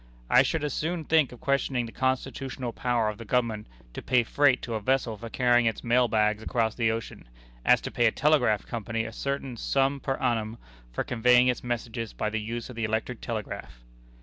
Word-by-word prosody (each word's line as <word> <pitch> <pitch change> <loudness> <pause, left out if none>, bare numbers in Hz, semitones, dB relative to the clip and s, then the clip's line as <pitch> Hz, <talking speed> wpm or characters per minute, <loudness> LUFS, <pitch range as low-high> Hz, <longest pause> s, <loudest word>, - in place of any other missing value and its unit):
I 125 - +8
should 150 +3 0
as 150 -3 -1
soon 165 +1 -2
think 155 -3 +3
of 125 - -12
questioning 135 -3 0
the 115 - -9
constitutional 130 -1 -2
power 120 -3 0
of 105 0 -4
the - - -6
Government 115 -2 -1 0.3
to - - -6
pay 125 -1 +3
freight 140 +2 +3
to 115 - -4
a 110 - -1
vessel 125 -1 +1
for 115 +2 -8
carrying 120 0 +3
its 115 - -2
mail 125 +1 +3
bags 105 -1 +1
across 110 -1 0
the 115 -2 +1
ocean, 110 - -5 0.3
as - - +5
to - - -5
pay 120 - +3
a - - +3
telegraph 135 -8 +2
company 115 0 -3
a 115 - -7
certain 140 0 -3
sum 135 +3 +1
per 135 0 -2
annum 115 -3 -1 0.3
for - - -2
conveying 125 +1 +4
its 125 - -1
messages 115 -2 -4
by 105 - -2
the 110 0 -2
use 115 +2 -5
of 125 - -10
the 115 - -3
electric 110 +2 -2
telegraph." 105 - -6
120 Hz, 205 wpm, -27 LUFS, 110-130 Hz, 0.3 s, I